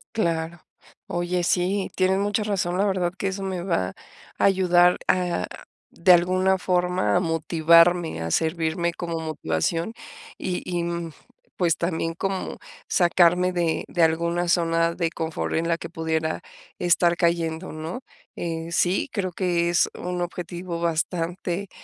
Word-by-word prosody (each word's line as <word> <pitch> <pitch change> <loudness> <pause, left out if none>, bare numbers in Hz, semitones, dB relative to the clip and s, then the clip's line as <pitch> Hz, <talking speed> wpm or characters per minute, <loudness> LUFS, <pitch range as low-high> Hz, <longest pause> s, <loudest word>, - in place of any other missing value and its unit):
Claro. 165 -4 -1 0.5
Oye, 175 +1 -1
sí, 185 +3 +1
tienes 190 +1 +2
mucha 205 +1 0
razón, 190 -4 -1
la 200 - +2
verdad, 185 -3 0
que 195 - -1
eso 190 +1 -5
me 190 -2 -3
va 170 - 0 0.5
a - - -1
ayudar, 180 -2 +4
ah, 175 - +1 0.4
de 180 +2 +5
alguna 185 +2 +3
forma, 180 0 +1
a - - +5
motivarme, 165 - +3
a 80 - -3
servirme 160 - 0
como 170 -2 -4
motivación. 160 - -2 0.4
Y 180 -1 -3
y, 175 -1 -2
mm, 170 -1 -4 0.4
pues 170 -3 +2
también, 165 -1 -1
como 195 +2 -3 0.3
sacarme 180 0 +3
de 170 -2 0
de 175 - +1
alguna 170 +2 +1
zona 165 -1 +2
de 170 -1 -1
confort, 160 -1 -3
en 165 +1 0
la 170 -1 +1
que 165 - -7
pudiera 160 -1 -2 0.4
estar 175 0 +3
cayendo, 170 0 0
¿no? 160 +9 -6 0.3
Eh, 165 -1 -4
sí, 175 +2 +1
creo 190 -4 -2
que 175 -1 0
es 175 - +3
un 180 0 -3
objetivo 175 0 -5
bastante 170 +3 -2
175 Hz, 145 wpm, -24 LUFS, 165-180 Hz, 0.5 s, de